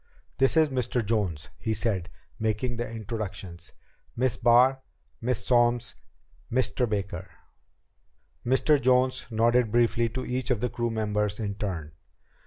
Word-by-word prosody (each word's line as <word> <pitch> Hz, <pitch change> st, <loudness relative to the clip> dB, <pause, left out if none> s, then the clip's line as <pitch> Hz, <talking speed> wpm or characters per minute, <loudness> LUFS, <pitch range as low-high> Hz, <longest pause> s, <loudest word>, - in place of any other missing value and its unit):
"This 135 Hz, +4 st, +3 dB
is 160 Hz, -2 st, +5 dB
Mr. 125 Hz, -2 st, -1 dB
Jones," 95 Hz, -8 st, -1 dB
he 110 Hz, -1 st, -1 dB
said, 95 Hz, -7 st, -1 dB, 0.3 s
making 110 Hz, +2 st, -1 dB
the 120 Hz, -1 st, -3 dB
introductions. 100 Hz, -6 st, -6 dB, 0.4 s
"Miss 125 Hz, 0 st, +1 dB
Barr, 125 Hz, +3 st, +4 dB, 0.4 s
Miss 115 Hz, -4 st, -1 dB
Solms 120 Hz, -1 st, +2 dB, 0.6 s
Mr. 120 Hz, -1 st, +1 dB
Baker." 95 Hz, -3 st, -3 dB, 1.1 s
Mr. 135 Hz, +3 st, +3 dB
Jones 130 Hz, +1 st, +2 dB
nodded 115 Hz, 0 st, +2 dB
briefly 115 Hz, 0 st, +2 dB
to 130 Hz, +3 st, -5 dB
each 125 Hz, +1 st, -2 dB
of 125 Hz, -4 st, +1 dB
the 125 Hz, -, -1 dB
crew 120 Hz, 0 st, -1 dB
members 105 Hz, -2 st, -1 dB
in 105 Hz, -2 st, -2 dB
turn. 90 Hz, -7 st, -4 dB
115 Hz, 130 wpm, -27 LUFS, 105-125 Hz, 1.1 s, is